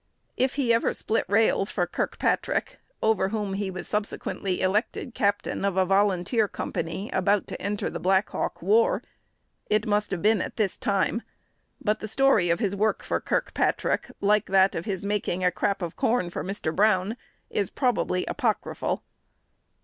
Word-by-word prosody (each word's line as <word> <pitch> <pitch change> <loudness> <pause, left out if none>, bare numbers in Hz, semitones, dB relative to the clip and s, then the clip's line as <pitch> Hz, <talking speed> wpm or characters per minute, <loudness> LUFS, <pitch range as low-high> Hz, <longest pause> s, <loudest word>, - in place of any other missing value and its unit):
If 260 +1 +1
he 255 -5 +2
ever 230 - +1
split 225 - 0
rails 200 0 +3
for 180 - 0
Kirkpatrick, 175 - -1 0.2
over 215 -3 +2
whom 205 -2 -2
he 195 0 -2
was 185 -1 -6
subsequently 205 -2 -2
elected 210 +5 0
captain 205 -2 0
of 200 -1 0
a 190 - +4
volunteer 195 +3 +2
company 190 +2 -4
about 195 +2 +2
to - - -7
enter 205 +1 -2
the - - -4
Black 190 +2 +2
Hawk - - -3
War, 465 +3 +3 0.7
it 215 +1 +2
must 210 -1 +1
have 190 -2 -3
been 215 -1 +4
at - - -5
this 210 -4 +1
time; 200 +3 0 0.6
but 210 0 0
the 215 - -5
story 220 -6 +3
of 170 - +3
his 200 -4 -1
work 215 +2 +1
for - - -1
Kirkpatrick, - - 0
like 210 +1 +3
that 190 0 +4
of 165 - -4
his 195 -3 -3
making 200 -3 -1
"a 180 - +4
crap 195 +1 -1
of 170 - -4
corn" 225 -7 +1
for - - -4
Mr. 190 -4 -3
Brown, 205 +1 +3 0.4
is 200 - 0
probably 240 -8 0
apocryphal. 235 -7 -1
205 Hz, 165 wpm, -26 LUFS, 190-220 Hz, 0.7 s, a